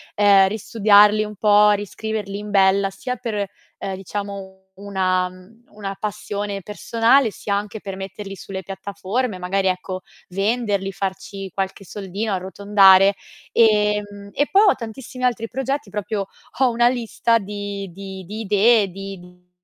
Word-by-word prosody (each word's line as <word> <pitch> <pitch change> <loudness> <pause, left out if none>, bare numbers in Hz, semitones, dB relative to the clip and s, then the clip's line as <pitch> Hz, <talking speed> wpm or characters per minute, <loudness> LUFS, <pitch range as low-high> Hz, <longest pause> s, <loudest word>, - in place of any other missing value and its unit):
ehm, 200 -2 +6
ristudiarli 210 0 +4
un 210 0 -7
po', 210 0 +5
riscriverli 205 0 -3
in 210 0 -7
bella, 195 0 +4
sia 250 +6 -4
per, 215 -5 -3 0.3
uhm, 195 -1 -4
diciamo 195 0 -6 0.2
una 185 -2 0
mhmm, 185 +6 -18
una 200 -2 -6
passione 205 -1 -4
personale, 230 +5 +2
sia 200 0 -3
anche 205 +1 -4
per 195 -2 -6
metterli 195 +1 -7
sulle 190 0 -7
piattaforme, 200 +3 -3
magari, 190 +2 0
ecco, 185 0 -2 0.3
venderli, 200 0 0
farci 195 0 -5
qualche 195 +2 -4
soldino, 205 +3 -4
e - - +2
arrotondare. 195 +1 +5 0.4
Ehm, 210 -2 +2
e 290 - +1
poi 395 - +6
ho - - +3
tantissimi 245 +2 -8
altri 235 -2 +1
progetti, 270 -1 -3
proprio 205 0 -3 0.3
ho 260 -2 +5
una 240 0 +3
lista 230 -1 +1
di 200 -1 -5
di 190 0 -8
di 210 +5 -7
idee, 210 +1 +4
di 195 0 -8
mhmm, 180 0 -19
200 Hz, 145 wpm, -21 LUFS, 195-215 Hz, 0.4 s, ehm